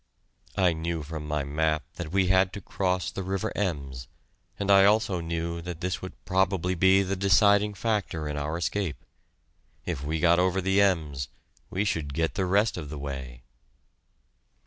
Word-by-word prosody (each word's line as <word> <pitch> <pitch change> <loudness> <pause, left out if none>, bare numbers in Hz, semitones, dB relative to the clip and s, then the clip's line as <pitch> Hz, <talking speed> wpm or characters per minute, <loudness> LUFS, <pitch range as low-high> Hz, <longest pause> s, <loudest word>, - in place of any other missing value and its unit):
I 90 -3 +4
knew 80 0 -3
from 75 0 -6
my 75 -1 -1
map 75 +2 0
that 85 -3 -5
we 95 -1 +3
had 95 0 +3
to 100 - -5
cross 90 -1 -1
the - - -5
river 95 0 -2
Ems, 70 -10 -3 0.5
and 100 0 0
I 100 0 +7
also 100 -3 +3
knew 85 0 -3
that 85 -1 -7
this 90 0 -2
would 95 - -7
probably 95 -1 +1
be 95 +2 +4
the 95 +1 -2
deciding 100 +2 +4
factor 100 -8 -1
in 75 - -3
our 75 +3 -2
escape. 90 -1 -2 0.8
If 65 - -3
we 80 +2 -2
got 85 +1 +4
over 90 +1 +2
the 95 +2 +2
Ems, 75 -9 +1 0.4
we 100 +3 -1
should 75 -8 -2
get 80 +1 0
the 95 - -1
rest 100 +3 +2
of 75 -5 -6
the 75 - -6
way. 65 -4 -6
90 Hz, 170 wpm, -27 LUFS, 75-95 Hz, 0.8 s, I